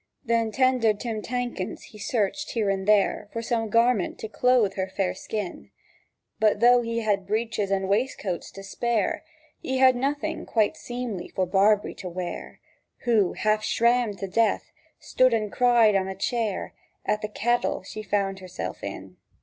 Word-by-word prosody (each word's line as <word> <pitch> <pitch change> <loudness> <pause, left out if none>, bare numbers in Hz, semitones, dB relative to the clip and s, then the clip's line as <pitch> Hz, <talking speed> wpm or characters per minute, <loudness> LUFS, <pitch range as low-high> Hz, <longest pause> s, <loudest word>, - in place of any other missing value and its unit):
Then 230 -1 +1
tender 255 -4 +3
Tim 220 0 -4
Tankens 245 -5 -4
he 210 - -13
searched 230 +7 -1
here 215 -4 +1
and 190 0 -3
there 210 0 +3
For 230 - -4
some 225 -1 -1
garment 230 -2 +2
to - - -6
clothe 240 -3 +2
her 190 -1 -2
fair 190 -1 -1
skin; 210 -5 -5 0.7
But 215 -2 +3
though 245 +1 +6
he 230 0 -2
had 200 -3 0
breeches 215 -1 -1
and 195 -1 0
waistcoats 200 -4 -1
to 195 - -9
spare, 225 +1 -1 0.4
He 260 - -2
had 260 -1 +6
nothing 280 +3 -2
quite 220 -3 +2
seemly 240 -7 -5
for 185 - -1
Barbree 200 +3 +3
to 185 - -6
wear, 175 0 -6 0.4
Who, 220 -6 +3
half 215 0 +1
shrammed 235 -3 +2
to 195 - -4
death, 225 +4 +1 0.3
stood 255 -2 +3
and 215 -2 -2
cried 240 -4 +4
on 190 -1 +1
a 190 - -4
chair 220 0 -2 0.3
At 210 - 0
the 215 - -2
caddle 240 -2 0
she 215 +3 -7
found 195 -1 -1
herself 185 -1 -6
in. 95 -2 -7
215 Hz, 165 wpm, -26 LUFS, 195-235 Hz, 0.7 s, though